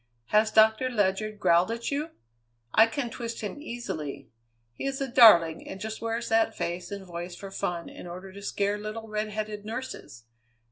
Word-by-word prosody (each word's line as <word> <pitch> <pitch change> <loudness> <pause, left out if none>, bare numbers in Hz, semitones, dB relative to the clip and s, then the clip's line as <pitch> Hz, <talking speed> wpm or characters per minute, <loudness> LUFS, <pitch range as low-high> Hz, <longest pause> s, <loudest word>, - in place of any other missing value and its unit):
Has 215 +1 +4
Doctor 220 +4 +4
Ledyard 210 -1 0
growled 175 -1 +4
at 230 +3 -3
you? 295 +3 -1 0.6
I 220 +1 +7
can 240 0 -3
twist 230 -1 -5
him 220 +7 -5
easily! 235 - -6 0.4
He 195 - -4
is 270 0 -2
a 275 - -1
darling, 190 -10 +6
and 190 - -7
just 220 +2 -5
wears 230 +1 -2
that 225 0 +2
face 175 +1 -3
and 200 -1 -6
voice 175 0 -6
for 195 +2 -9
fun 175 -4 -3
in - - -10
order 185 +2 -8
to 200 - -10
scare 200 +1 -1
little 215 +2 -6
redheaded 215 0 -3
nurses. 220 - -7
215 Hz, 175 wpm, -28 LUFS, 190-230 Hz, 0.6 s, I